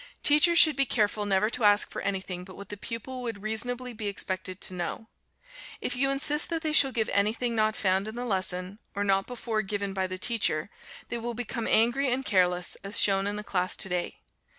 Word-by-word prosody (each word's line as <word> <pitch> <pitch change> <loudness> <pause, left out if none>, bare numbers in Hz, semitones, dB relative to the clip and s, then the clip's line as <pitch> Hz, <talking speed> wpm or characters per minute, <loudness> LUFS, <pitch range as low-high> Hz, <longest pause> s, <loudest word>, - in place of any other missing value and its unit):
Teachers 300 +4 +6
should 310 -4 +7
be 275 0 +1
careful 210 -2 0
never 195 +1 +2
to 240 - -2
ask 205 0 +5
for - - -5
anything 190 -2 -3
but 185 0 -12
what 200 - -11
the 205 - -5
pupil 230 +5 -6
would 225 -4 -6
reasonably 245 +3 -2
be 215 -2 -5
expected 190 -2 -1
to - - -1
know. 180 +5 -5 0.7
If - - -1
you 270 +2 +1
insist 290 +2 0
that 330 -1 -3
they 310 -1 -1
shall 275 -3 +5
give 225 -3 -1
anything 220 +4 0
not 215 -1 +1
found 190 +1 +1
in 220 - -7
the 245 +1 -4
lesson, 190 -1 -2 0.2
or 200 - -1
not 195 -1 +2
before 235 -3 -3
given 200 -1 -4
by 190 -1 -1
the 185 0 -5
teacher, 200 -5 0 0.4
they 235 - -4
will 235 0 -5
become 235 -1 -4
angry 240 +5 +3
and 260 +2 -1
careless, 180 -4 +1
as 200 +2 +3
shown 195 0 +4
in 205 - -2
the 210 - -5
class 185 -1 -1
to 190 - +1
day. 180 -1 -3
210 Hz, 215 wpm, -27 LUFS, 195-245 Hz, 0.7 s, should